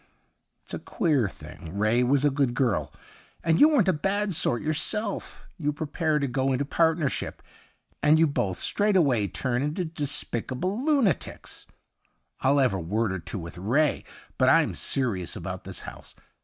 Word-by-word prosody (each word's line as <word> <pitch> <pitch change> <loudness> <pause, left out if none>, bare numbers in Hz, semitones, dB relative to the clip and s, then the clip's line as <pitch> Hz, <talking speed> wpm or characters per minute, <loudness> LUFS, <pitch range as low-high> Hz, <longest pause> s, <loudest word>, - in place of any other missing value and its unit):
' - - -50
It's - - -9
a - - -3
queer 150 - 0
thing: 85 -1 -10
Ray 110 +4 +2
was 135 +3 +3
a 145 - +4
good 135 -3 0
girl, 105 - 0 0.5
and 165 0 +2
you 300 - +8
weren't 265 - +3
a 185 - +4
bad 195 +5 -1
sort 120 -6 +2
yourself. 200 +7 -2
You 150 -2 0
prepare 155 +1 -1
to 140 - 0
go 130 +1 0
into 135 +2 0
partnership, 160 -1 0 0.6
and 150 +1 +5
you 165 - +5
both 100 - -1
straightway 165 - +2
turn 125 +3 -2
into 150 +5 -2
despicable 155 - -2
lunatics. 280 - 0 0.7
I'll 140 +2 +3
have 130 -6 +3
a 95 - -2
word 100 +5 -1
or 95 - -3
two 85 - -5
with 85 -1 -8
Ray. 135 +10 +1 0.4
But - - +5
I'm - - +4
serious 110 -10 -1
about - - -6
this - - -7
house. - - -11
145 Hz, 165 wpm, -26 LUFS, 120-165 Hz, 0.7 s, you